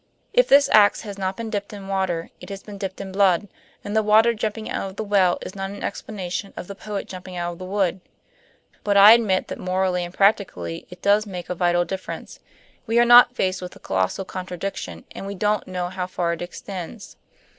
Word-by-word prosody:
If -, -, +4 dB
this 280 Hz, +1 st, +6 dB
ax 205 Hz, -1 st, +5 dB
has 200 Hz, -2 st, -8 dB
not 190 Hz, 0 st, -2 dB
been 230 Hz, -1 st, -5 dB
dipped 205 Hz, -1 st, -4 dB
in 200 Hz, -2 st, -8 dB
water, 190 Hz, -4 st, -2 dB
it 180 Hz, -, -11 dB
has 195 Hz, 0 st, -7 dB
been 205 Hz, -2 st, -10 dB
dipped 190 Hz, -2 st, -5 dB
in 195 Hz, -1 st, -6 dB
blood; 195 Hz, 0 st, +3 dB, 0.4 s
and 205 Hz, -, -4 dB
the 220 Hz, -, +4 dB
water 220 Hz, +2 st, +5 dB
jumping 220 Hz, 0 st, -3 dB
out 195 Hz, -, -3 dB
of 190 Hz, -, -13 dB
the 220 Hz, -, -3 dB
well 195 Hz, -4 st, +3 dB
is -, -, -7 dB
not 195 Hz, -1 st, -4 dB
an 200 Hz, +1 st, -8 dB
explanation 195 Hz, -2 st, -5 dB
of -, -, -5 dB
the 200 Hz, -, -7 dB
poet 200 Hz, 0 st, -6 dB
jumping 185 Hz, -1 st, -8 dB
out 175 Hz, 0 st, -2 dB
of 170 Hz, -, -14 dB
the 185 Hz, -, -6 dB
wood. 190 Hz, -1 st, 0 dB, 0.8 s
But 205 Hz, -1 st, +2 dB
I 200 Hz, +2 st, +10 dB
admit 215 Hz, -5 st, +2 dB
that -, -, -6 dB
morally 185 Hz, -1 st, 0 dB
and 175 Hz, -, -6 dB
practically 190 Hz, -, 0 dB
it 180 Hz, 0 st, -13 dB
does 205 Hz, +1 st, +3 dB
make 180 Hz, -2 st, -6 dB
a -, -, +1 dB
vital 175 Hz, 0 st, +2 dB
difference. 190 Hz, 0 st, -7 dB, 0.5 s
We 225 Hz, +1 st, +1 dB
are 240 Hz, -, +6 dB
not 245 Hz, +1 st, +8 dB
faced 185 Hz, -5 st, -1 dB
with 180 Hz, 0 st, -8 dB
a -, -, -14 dB
colossal 95 Hz, -, -1 dB
contradiction, 180 Hz, -, -6 dB
and 195 Hz, -, -7 dB
we 200 Hz, -, -5 dB
don't 210 Hz, +1 st, 0 dB
know 180 Hz, -1 st, -3 dB
how 185 Hz, -1 st, -4 dB
far 175 Hz, -2 st, -1 dB
it 170 Hz, -, -7 dB
extends. 185 Hz, +3 st, -7 dB
195 Hz, 220 wpm, -23 LUFS, 180-205 Hz, 0.8 s, I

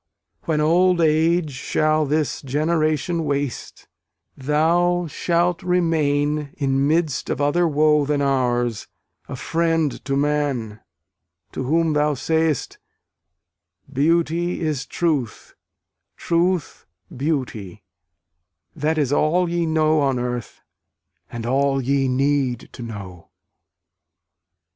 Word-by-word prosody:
When 155 Hz, -2 st, 0 dB
old 175 Hz, +3 st, +3 dB
age 160 Hz, 0 st, +2 dB
shall 155 Hz, +3 st, 0 dB
this 150 Hz, -1 st, -1 dB
generation 155 Hz, +3 st, 0 dB
waste, 140 Hz, -4 st, -4 dB, 0.5 s
Thou 170 Hz, +5 st, +1 dB
shalt 170 Hz, +2 st, 0 dB
remain, 150 Hz, -5 st, 0 dB
in 135 Hz, -1 st, +1 dB
midst 160 Hz, -2 st, 0 dB
of -, -, -2 dB
other 145 Hz, +5 st, +2 dB
woe 150 Hz, 0 st, +3 dB
Than 145 Hz, 0 st, 0 dB
ours, 120 Hz, -5 st, 0 dB, 0.4 s
a -, -, -5 dB
friend 165 Hz, -3 st, -1 dB
to 135 Hz, -, -1 dB
man, 140 Hz, -7 st, -1 dB, 0.7 s
to 130 Hz, -, -4 dB
whom 160 Hz, +3 st, +1 dB
thou 150 Hz, 0 st, +1 dB
say'st, 160 Hz, 0 st, -1 dB, 1.1 s
"Beauty 170 Hz, +4 st, +1 dB
is 150 Hz, -5 st, -2 dB
truth, 145 Hz, -10 st, -2 dB, 0.6 s
truth 175 Hz, -1 st, -1 dB, 0.3 s
beauty" 120 Hz, -, -3 dB, 0.9 s
that 155 Hz, +1 st, -1 dB
is 145 Hz, -3 st, +1 dB
all 175 Hz, +5 st, +2 dB
Ye 170 Hz, -1 st, -1 dB
know 155 Hz, -1 st, +2 dB
on 135 Hz, -2 st, +1 dB
earth, 120 Hz, -1 st, -4 dB, 0.7 s
and 115 Hz, -1 st, -6 dB
all 135 Hz, +2 st, +1 dB
ye 135 Hz, +1 st, +1 dB
need 130 Hz, -1 st, 0 dB
to -, -, -11 dB
know. 100 Hz, -7 st, -9 dB
150 Hz, 105 wpm, -22 LUFS, 135-165 Hz, 1.1 s, old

